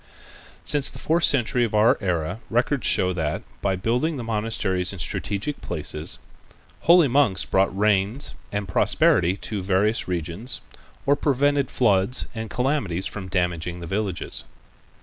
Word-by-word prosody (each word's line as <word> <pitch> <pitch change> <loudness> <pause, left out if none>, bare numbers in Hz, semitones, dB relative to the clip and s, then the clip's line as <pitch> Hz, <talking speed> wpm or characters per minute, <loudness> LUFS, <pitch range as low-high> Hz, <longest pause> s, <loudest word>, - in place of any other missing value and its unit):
Since 145 -2 +2
the - - -10
fourth 170 +2 +2
century 125 -2 +2
of 110 -2 -1
our 105 +2 +5
era 90 0 -1
records 125 +4 +1
show 90 0 +3
that 80 -3 -2 0.2
by 95 - +1
the 90 - -9
building 135 +6 0
of 120 - -5
monasteries 105 -4 -1
in 100 - -8
strategic 100 - -3
place's 75 -1 0 0.7
holy 170 -3 +8
monks 125 -8 +2
brought 95 0 +1
rains 105 +5 +1 0.2
and 100 -1 -3
prosperity 90 0 +3
to 105 0 -4
various 100 +4 +1
regions, 90 - -4 0.4
or 140 - +4
prevented 145 -1 +1
floods 105 0 +2
and 110 -1 -5
calamities 125 - 0
from 100 -2 -5
damaging 90 -2 -1
the 85 - -7
villages. 95 +3 -3
105 Hz, 145 wpm, -24 LUFS, 90-125 Hz, 0.7 s, holy